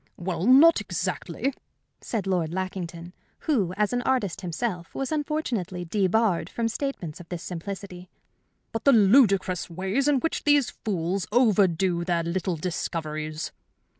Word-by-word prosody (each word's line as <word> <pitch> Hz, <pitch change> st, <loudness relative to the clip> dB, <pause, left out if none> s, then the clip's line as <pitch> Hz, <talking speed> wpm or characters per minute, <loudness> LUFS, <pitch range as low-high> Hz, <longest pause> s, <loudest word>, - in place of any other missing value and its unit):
"Well, 175 Hz, +1 st, -2 dB
not 295 Hz, +6 st, +7 dB
exactly," 275 Hz, -, -3 dB, 0.5 s
said 215 Hz, -5 st, -3 dB
Lord 175 Hz, -4 st, 0 dB
Lackington, 175 Hz, -2 st, -5 dB, 0.3 s
who, 215 Hz, -, +1 dB
as 210 Hz, +2 st, +1 dB
an 245 Hz, -, +1 dB
artist 245 Hz, -9 st, 0 dB
himself, 180 Hz, 0 st, -4 dB
was 270 Hz, +1 st, -3 dB
unfortunately 260 Hz, -, -2 dB
debarred 200 Hz, +1 st, +1 dB
from 230 Hz, -1 st, -1 dB
statements 225 Hz, -, -4 dB
of 175 Hz, -, -12 dB
this 175 Hz, -2 st, -5 dB
simplicity. 180 Hz, 0 st, -7 dB, 0.6 s
"But 225 Hz, -, -4 dB
the 280 Hz, -, +7 dB
ludicrous 200 Hz, -5 st, +4 dB
way 190 Hz, +4 st, -4 dB
in 275 Hz, 0 st, +3 dB
which 325 Hz, -, -1 dB
these 290 Hz, -3 st, +3 dB
fools 190 Hz, -2 st, -2 dB
overdo 190 Hz, -7 st, +3 dB
their 170 Hz, -1 st, 0 dB
little 180 Hz, +1 st, -1 dB
discoveries!" 155 Hz, -2 st, -3 dB
190 Hz, 135 wpm, -26 LUFS, 175-235 Hz, 0.6 s, not